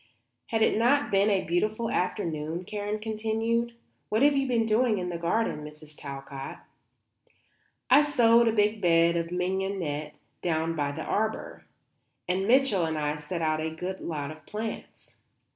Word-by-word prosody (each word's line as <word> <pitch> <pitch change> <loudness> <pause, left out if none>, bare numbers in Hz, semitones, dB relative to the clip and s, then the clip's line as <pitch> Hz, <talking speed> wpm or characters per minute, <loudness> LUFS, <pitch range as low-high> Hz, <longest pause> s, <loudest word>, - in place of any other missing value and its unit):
"Has 225 -1 +1
it - - +3
not 280 +5 +3
been 200 +1 +4
a 195 -2 +2
beautiful 215 +7 0
afternoon?" 170 -2 -2
Karen 205 +1 -3
continued. 225 +2 -1 0.3
"What 220 +5 +2
have 290 0 +5
you 275 -1 +1
been 235 -3 +2
doing 225 0 +2
in 180 -1 -3
the 175 - -3
garden, 170 -2 0
Mrs. 150 0 -12
Talcott?" 135 -1 -7 1.3
"I 270 +3 +7
sowed 235 -5 +4
a - - +4
big 210 0 +1
bed 170 -1 +4
of 170 0 -1
mignonette 180 -5 -2 0.2
down 165 -1 0
by 145 -2 -1
the 145 - -5
arbour, 220 +1 -2 0.6
and 185 +2 0
Mitchell 245 -7 +4
and 160 -1 -2
I 150 0 -1
set 150 +3 -4
out 155 0 +1
a 160 - -1
good 180 +4 -5
lot 150 -3 -4
of 155 -1 -12
plants." 215 +1 -6
190 Hz, 160 wpm, -28 LUFS, 160-225 Hz, 1.3 s, I